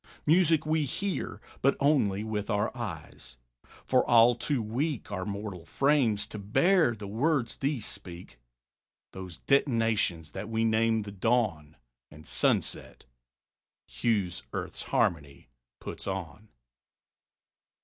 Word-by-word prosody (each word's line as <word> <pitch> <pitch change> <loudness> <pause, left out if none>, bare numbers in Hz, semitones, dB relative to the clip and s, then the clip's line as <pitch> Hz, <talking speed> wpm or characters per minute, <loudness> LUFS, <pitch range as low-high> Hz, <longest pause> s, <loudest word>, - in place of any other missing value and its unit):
Music 165 -1 +4
we 155 0 +1
hear, 185 +8 -3 0.2
but 140 - +3
only 120 -9 +2
with 105 -1 -3
our 105 -2 0
eyes. - - -7 0.5
For 130 -1 +3
all 120 0 +7
too 130 +3 -1
weak 120 +4 -2
Our 95 -2 -3
mortal 100 -3 -5
frames 130 - +2
to 105 - -8
bear 155 - +3
the 105 -1 -8
words 120 +4 0
these 135 -5 -1
speak, 90 -9 -8 0.7
Those 95 -3 -8
detonations 115 - +1
that 100 +3 -6
we 115 0 +1
name 110 0 +2
the 100 -1 -7
dawn 95 -8 0 0.3
And 75 +1 -14
sunset - - -1 0.8
hues 90 - -1
Earth's - - -5
harmony 70 -5 -1 0.3
puts - - -7
on. 95 +2 -5
110 Hz, 120 wpm, -29 LUFS, 95-135 Hz, 0.8 s, all